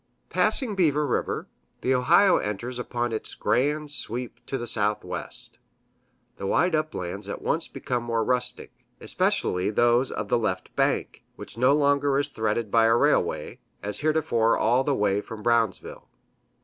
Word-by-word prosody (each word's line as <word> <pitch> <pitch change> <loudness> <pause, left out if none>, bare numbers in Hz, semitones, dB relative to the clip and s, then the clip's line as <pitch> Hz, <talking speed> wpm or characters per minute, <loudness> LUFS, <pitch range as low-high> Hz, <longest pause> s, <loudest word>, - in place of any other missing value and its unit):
Passing 250 -7 +1
Beaver 150 -6 +2
River, 125 - -2 0.3
the 130 - +1
Ohio 170 +10 +5
enters 120 +5 -4
upon 120 -1 -2
its 110 - -5
grand 150 +3 0
sweep 125 -3 -5
to 135 - -2
the 120 - -5
southwest. 105 -2 -3 0.8
The 95 - -4
wide 175 - +2
uplands 100 - -3
at - - -6
once - - 0
become 125 -1 -3
more 115 -1 -1
rustic, 125 +1 -2 0.3
especially 90 +2 0
those 120 +4 +3
of - - -4
the - - +2
left - - -3
bank, - - 0
which - - -10
no 125 +4 +4
longer 145 -1 +2
is 145 0 0
threaded 110 -3 -2
by 115 -1 +5
a 115 0 +4
railway, - - +1 0.2
as 105 +1 -4
heretofore 150 -7 +2
all 120 +4 +2
the 140 0 0
way 105 -2 +1
from 105 0 -9
Brownsville. 115 -5 0
120 Hz, 150 wpm, -25 LUFS, 110-145 Hz, 0.8 s, Ohio